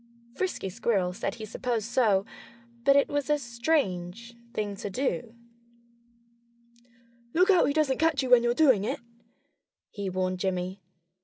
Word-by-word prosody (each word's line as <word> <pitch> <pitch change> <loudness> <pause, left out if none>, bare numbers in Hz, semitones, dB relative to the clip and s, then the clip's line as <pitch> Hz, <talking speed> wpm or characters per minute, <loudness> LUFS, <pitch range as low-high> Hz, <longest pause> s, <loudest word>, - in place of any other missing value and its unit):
Frisky 365 - -2
Squirrel 190 -3 0
said 195 +1 -3
he 220 - -7
supposed 225 0 -2
so 220 -5 +2 0.6
but 275 - +6
it 280 - +4
was 290 -1 -2
a 295 - +4
strange 235 - -2 0.2
thing 210 -4 -3
to 205 - -5
do. 230 -1 -2 2.0
"Look 365 +4 +5
out 365 - +5
he 285 - +1
doesn't 295 -4 +1
catch 310 -3 +2
you 255 - -3
when 245 -1 +8
you're 240 0 +1
doing 260 -10 +4
it!" - - -2 0.9
he 200 -2 -4
warned 185 0 -2
Jimmy. 185 0 -2
235 Hz, 145 wpm, -28 LUFS, 195-275 Hz, 2.0 s, when